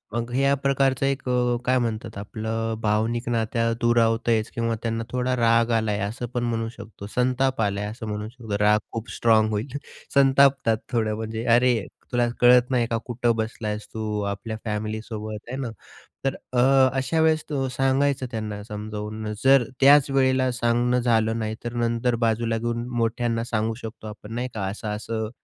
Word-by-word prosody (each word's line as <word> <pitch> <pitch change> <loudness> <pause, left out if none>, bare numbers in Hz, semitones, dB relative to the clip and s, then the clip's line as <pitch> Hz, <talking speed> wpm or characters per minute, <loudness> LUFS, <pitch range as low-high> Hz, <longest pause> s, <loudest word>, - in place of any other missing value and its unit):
मग 120 +1 -2
ह्या 140 +2 +2
प्रकारचं 135 -1 +1
एक 135 -1 -1
अ, 125 -1 +2
काय 130 +1 +3
म्हणतात 115 -2 -3
आपलं 110 +2 -3
अ, - - -2
भावनिक 110 +3 0
नात्या 115 0 0
दूरावतच 115 -1 +2
किंवा 115 -1 0
त्यांना 115 0 -1
थोडा 125 0 0
राग 115 0 +3
आला 110 -1 -1
आहे, 105 - -1
असं 105 +5 -3
पण 120 -1 -1
म्हणू 115 -1 -1
शकतो, 100 -1 -10
संताप 130 0 +1
आलाय 100 0 0
असं 110 +1 -6
म्हणू 105 0 -4
शकतो. 115 -4 -5
राग 105 +1 +4
खूप 115 0 -5
स्ट्राँग 110 -2 +4
होईल, 115 +6 -3 0.4
संतापतात 135 -3 +4
थोडं, 110 -3 0
म्हणजे 110 +1 -4
"अरे, 120 -4 +3 0.3
तुला 120 -1 +2
कळत 125 0 +6
नाही 120 -2 +2
का 115 - -1
कुठं 120 -1 0
बसलायेस 110 -1 -3
तू? 110 -1 -2
आपल्या 100 +2 -4
फॅमिलीसोबत 110 0 -4
आहे 130 - -4
ना? 120 - -3 0.6
तर 135 - +1 0.2
अ, 120 - +2 0.4
अशा 160 +5 0
वेळेस 160 -1 +3
तो 135 -3 -1
सांगायचं 135 +1 +1
त्यांना 105 -2 -4
समजावून, 105 0 -5
जर 135 -1 +6 0.2
त्याच 140 0 +6
वेळेला 130 -1 +2
सांगणं 120 +1 +1
झालं 115 -1 +1
नाही, 110 0 -2
तर 120 0 -4
नंतर 120 0 0
बाजूला 115 0 0
घेऊन 120 +1 -3
मोठ्यांना 115 0 0
सांगू 115 -1 -1
शकतो 110 -1 -8
आपण, 105 +1 -9
नाही 125 +2 -2
का? 105 -3 -3
"असं-असं 110 +2 -4
115 Hz, 170 wpm, -24 LUFS, 110-125 Hz, 0.6 s, कळत